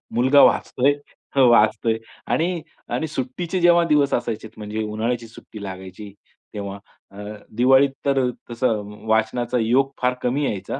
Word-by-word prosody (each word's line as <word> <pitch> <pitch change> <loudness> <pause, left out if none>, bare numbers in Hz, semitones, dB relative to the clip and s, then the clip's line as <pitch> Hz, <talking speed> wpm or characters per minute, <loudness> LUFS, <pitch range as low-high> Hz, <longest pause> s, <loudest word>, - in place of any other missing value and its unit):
मुलगा 130 +4 +5
वाचतोय 140 +3 +3 0.4
हं, 135 -2 +6
वाचतोय 110 0 +3 0.3
आणि 170 0 0 0.3
आणि 160 - -2
सुट्टीचे 155 +6 -3
जेव्हा 175 0 +5
दिवस 145 -3 +2
असायचे. 110 -2 -2
म्हणजे 110 +1 -4
उन्हाळ्याची 115 +2 -2
सुट्टी 110 -1 -12
लागायची. 95 +1 -8 0.4
तेव्हा 100 -1 -5 0.3
अ, 100 - -15 0.4
दिवाळीत 130 +3 +5 0.2
तर 135 -2 +2 0.2
तसं 115 -3 0 0.2
वाचनाचा 110 +3 +1
योग 130 +5 +2
फार 125 0 +2
कमी 135 +4 0
यायचा. 100 +5 -3
120 Hz, 135 wpm, -22 LUFS, 110-135 Hz, 0.4 s, हं